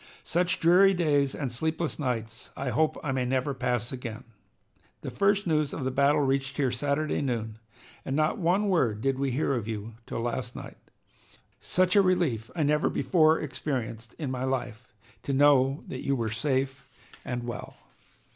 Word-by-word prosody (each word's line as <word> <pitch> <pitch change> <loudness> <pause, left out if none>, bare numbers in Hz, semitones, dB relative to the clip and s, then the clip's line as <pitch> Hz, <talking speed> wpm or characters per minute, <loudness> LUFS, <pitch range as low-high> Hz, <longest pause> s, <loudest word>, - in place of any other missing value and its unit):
Such 175 +1 0
dreary 190 +3 +5
days 145 -5 +2
and 135 -4 -3
sleepless 160 +7 -2
nights 115 -5 -3
I 135 - -2
hope 155 +6 +1
I 150 - -1
may 130 -1 0
never 130 +2 0
pass 125 -2 -1
again. 120 -4 -6 0.8
The - - -5
first 200 0 +2
news 155 -4 +1
of 140 - -4
the 130 - -1
battle 140 +3 +3
reached 135 0 0
here 135 -4 +1
Saturday 145 +5 -1
noon, 110 -5 -3 0.4
and 135 - -3
not 155 +7 +1
one 190 +4 +2
word 125 - +1
did 135 0 0
we 140 0 0
hear 135 +2 0
of 115 -4 -2
you 110 0 -5
till - - -3
last 120 +1 -3
night. - - -9 0.8
Such 185 +2 +1
a 200 - +7
relief 165 - +1
I 160 - +1
never 150 +1 +2
before 155 +4 +3
experienced 125 -5 -4
in 145 -5 -3
my 130 0 -3
life, 125 -3 -3 0.3
to 140 - -3
know 140 -1 +4
that 130 - -6
you 140 - +1
were 115 -4 -2
safe 135 +3 -1 0.4
and 125 -1 -4
well. 120 0 -6
135 Hz, 175 wpm, -28 LUFS, 125-155 Hz, 0.8 s, a